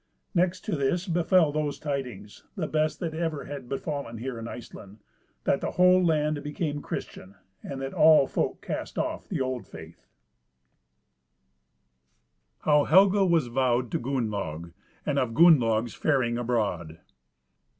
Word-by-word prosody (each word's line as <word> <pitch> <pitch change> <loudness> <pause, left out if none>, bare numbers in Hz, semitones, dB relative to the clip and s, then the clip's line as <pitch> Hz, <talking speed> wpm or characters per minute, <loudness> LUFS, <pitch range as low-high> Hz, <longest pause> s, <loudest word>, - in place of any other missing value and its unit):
Next 180 0 +1
to - - -3
this 160 +7 -1
befell 175 -2 +3
those 150 -1 -2
tidings, 125 -9 -5
the 180 -6 -2
best 155 0 0
that 165 -3 -3
ever 160 -3 -3
have 140 -4 -8
befallen 140 -4 -4
here 120 +1 -5
in 115 - -6
Iceland, 105 -4 -10 0.5
that - - +1
the - - -2
whole 180 0 +5
land 155 -3 +1
became 150 0 -3
Christian, 95 -7 -7 0.3
and 135 - -6
that 135 - -5
all 155 -3 +6
folk - - -2
cast - - -5
off - - -3
the - - -2
old 130 -2 -3
faith. - - -13 2.5
CHAPTER - - -37
VI. 155 - +2
How 150 0 +5
Helga 195 +3 +5
was 165 -5 +3
vowed 125 -1 0
to - - -1
Gunnlaug, 100 - -3 0.3
and 140 -2 +1
of 115 -4 -2
Gunnlaug's 120 -9 +4
faring 125 -6 0
abroad. 100 -10 -2
140 Hz, 145 wpm, -27 LUFS, 120-160 Hz, 2.5 s, all